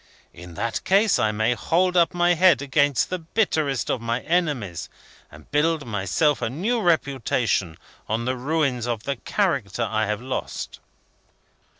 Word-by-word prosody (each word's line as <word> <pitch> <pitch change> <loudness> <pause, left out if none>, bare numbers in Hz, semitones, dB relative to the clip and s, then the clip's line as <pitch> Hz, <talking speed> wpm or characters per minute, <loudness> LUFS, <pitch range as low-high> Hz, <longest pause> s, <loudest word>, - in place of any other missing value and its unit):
In 85 0 -11
that 115 +4 -3
case, 200 +2 +3
I 110 -2 +2
may 110 +3 +1
hold 175 +10 +1
up 170 -2 +4
my 175 0 +3
head 180 -3 +4
against 145 +1 +1
the 185 - -2
bitterest 160 - 0
of 120 - -2
my 115 +2 -2
enemies, 145 - -1 0.4
and 75 +1 -16
build 155 +1 +1
myself 110 - 0
a - - -1
new 210 - -1
reputation 130 - 0 0.3
on 115 +2 -1
the 130 +1 0
ruins 130 -3 -1
of 115 -3 -2
the 140 +2 -3
character 130 - -1
I 110 -1 0
have 105 0 -1
lost." 130 +2 -5
135 Hz, 155 wpm, -23 LUFS, 110-165 Hz, 0.4 s, up